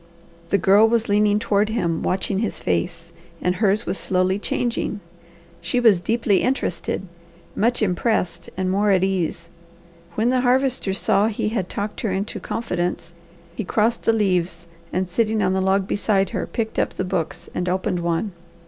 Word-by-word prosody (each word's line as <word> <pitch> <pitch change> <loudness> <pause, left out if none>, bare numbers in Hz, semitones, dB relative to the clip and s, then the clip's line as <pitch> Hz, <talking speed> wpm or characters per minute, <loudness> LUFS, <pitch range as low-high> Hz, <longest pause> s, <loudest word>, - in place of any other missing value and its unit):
The 200 - +3
Girl 200 +4 +5
was 230 -1 +1
leaning 205 0 +3
toward 210 -1 +1
him, 170 -8 -1
watching 190 +1 -1
his 220 -1 -1
face, 170 -1 -2 0.3
and 180 0 0
hers 210 +1 +2
was - - -1
slowly 185 +1 +1
changing. 230 -1 -2 0.6
She 175 +8 0
was 225 -7 +5
deeply 220 0 +1
interested, 250 -8 -1 0.5
much 235 +2 +2
impressed, 180 -3 0
and 185 0 0
more 205 +2 +2
at 190 -2 +4
ease. 170 -3 -1 0.6
When 225 +3 +2
the 255 -1 +2
Harvester 255 -5 +1
saw 200 +2 +2
he 210 -1 -1
had 200 -5 -2
talked 205 +1 -4
her 225 - -1
into 195 +2 -3
confidence 175 -5 -3 0.4
he 220 - -3
crossed 220 +4 +1
the - - +3
leaves, 185 -5 0 0.3
and 185 +1 -1
sitting 215 +3 +1
on 185 0 +2
the 190 - +1
log 190 0 +2
beside 200 -2 +1
her, - - -3
picked 220 -1 -3
up - - 0
the - - -2
books 180 -4 -3
and 180 0 -1
opened 180 -1 -1
one. 170 +4 -1
195 Hz, 165 wpm, -22 LUFS, 180-220 Hz, 0.6 s, Girl